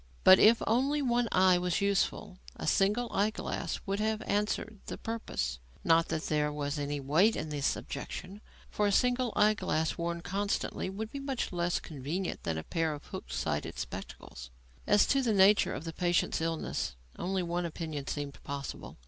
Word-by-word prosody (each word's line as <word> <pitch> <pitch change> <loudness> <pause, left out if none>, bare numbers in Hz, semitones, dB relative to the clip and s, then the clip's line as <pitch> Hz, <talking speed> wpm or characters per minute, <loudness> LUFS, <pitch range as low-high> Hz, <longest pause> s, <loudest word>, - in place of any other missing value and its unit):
But 185 - +9
if 225 +2 +6
only 275 +6 +2
one 240 -2 +1
eye 185 -1 +5
was 180 -1 0
useful, 200 -1 0 0.2
a - - -6
single 210 +5 +2
eye 205 +2 +3
glass 220 - -4
would 195 +1 -1
have 220 0 0
answered 210 +1 -1
the - - -5
purpose; 65 - -3 0.2
not 165 0 +4
that 155 - -2
there 150 -1 +1
was 145 0 -3
any 145 0 -2
weight 160 +11 +3
in 155 - -3
this 145 -2 0
objection, 185 +8 -7 0.3
for 210 - +1
a - - +2
single 250 +2 +2
eye 210 +1 +5
glass 160 -6 -1
worn 170 0 -2
constantly 200 +1 -2
would 215 +3 -5
be 280 - -5
much 275 -2 -3
less 175 0 0
convenient 160 +5 -4
than 80 -1 -2
a 80 - -4
pair 160 -2 -1
of 145 - -12
hook - - -7
sided 60 -1 -2
spectacles. 65 -1 -7 0.4
As 205 0 +5
to 275 - +2
the 235 -4 +1
nature 200 +1 +5
of - - -6
the 165 -1 -5
patient's 175 0 +1
illness, 165 - -2 0.2
only 185 0 -1
one 175 0 -1
opinion 155 -4 -5
seemed 145 -1 -4
possible. 140 0 -6
180 Hz, 180 wpm, -31 LUFS, 155-210 Hz, 0.4 s, But